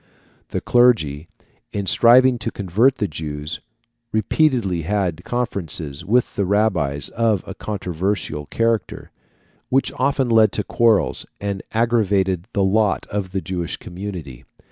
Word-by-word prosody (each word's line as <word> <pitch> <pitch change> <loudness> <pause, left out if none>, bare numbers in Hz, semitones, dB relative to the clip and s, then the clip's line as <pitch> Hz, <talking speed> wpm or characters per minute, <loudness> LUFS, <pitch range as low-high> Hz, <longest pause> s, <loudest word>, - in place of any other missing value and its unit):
The - - -3
clergy, 95 - +3 0.4
in 100 -1 -3
striving 125 +4 +5
to 110 - -2
convert 105 +8 +2
the 105 - -1
Jews, 75 0 -5 0.5
repeatedly 110 - +1
had 90 -1 -1
conferences 85 - -3
with 120 +7 +1
the 100 - 0
rabbis 95 -9 +1
of 110 -4 0
a - - -7
controversial 90 -5 -3
character, 115 -1 -1 0.6
which 135 +1 +2
often 135 0 +1
led 110 -3 +4
to 105 - -1
quarrels, 115 -2 +1
and 100 -1 -3
aggravated 100 -6 +1
the 100 - +1
lot 100 +1 +2
of 100 -3 -3
the 95 0 -2
Jewish 90 -3 -4
community. 85 -9 -8
100 Hz, 125 wpm, -21 LUFS, 85-115 Hz, 0.6 s, striving